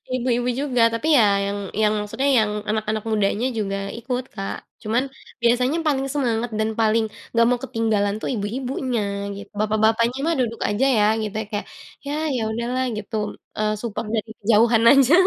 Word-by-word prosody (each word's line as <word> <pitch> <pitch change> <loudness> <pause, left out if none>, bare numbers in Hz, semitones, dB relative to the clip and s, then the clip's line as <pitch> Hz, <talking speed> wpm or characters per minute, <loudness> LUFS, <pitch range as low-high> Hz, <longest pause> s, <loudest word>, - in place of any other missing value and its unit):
ibu-ibu 245 0 0
juga 255 -4 0
tapi 305 +7 +1
ya 255 - +7 0.2
yang 200 +1 -2 0.2
yang 210 0 +3
maksudnya 265 +7 -1
yang 215 -1 +1
anak-anak 215 0 -1
mudanya 215 +1 +1
juga 195 -3 -2 0.2
ikut 250 +2 -3
Kak 195 -2 -4 0.3
cuman 235 +4 +1 0.4
biasanya 250 +6 +2
paling 270 -2 +1
semangat 240 -4 0
dan 220 0 +1
paling 220 0 +3 0.3
nggak 230 0 +4
mau 250 - +2
ketinggalan 220 -5 0
tuh - - -3
ibu-ibunya 245 +2 -2 0.3
gi 200 - -7 0.2
bapak-bapaknya 220 +3 +2
mah 335 0 +1
duduk 230 -2 -3
aja 215 +6 +1
ya 210 - +4 0.2
gitu 210 0 -4
ya - - -6
kayak 205 - -3 0.4
ya 285 - -3 0.2
ya 235 - -1
udahlah 240 +3 -1
gitu, 215 +2 -6 0.4
eee, 215 0 +1
support 230 -1 -4
dari 220 0 -1
kejauhan 225 +2 +4
aja. 275 +1 +5
230 Hz, 165 wpm, -22 LUFS, 215-250 Hz, 0.4 s, ya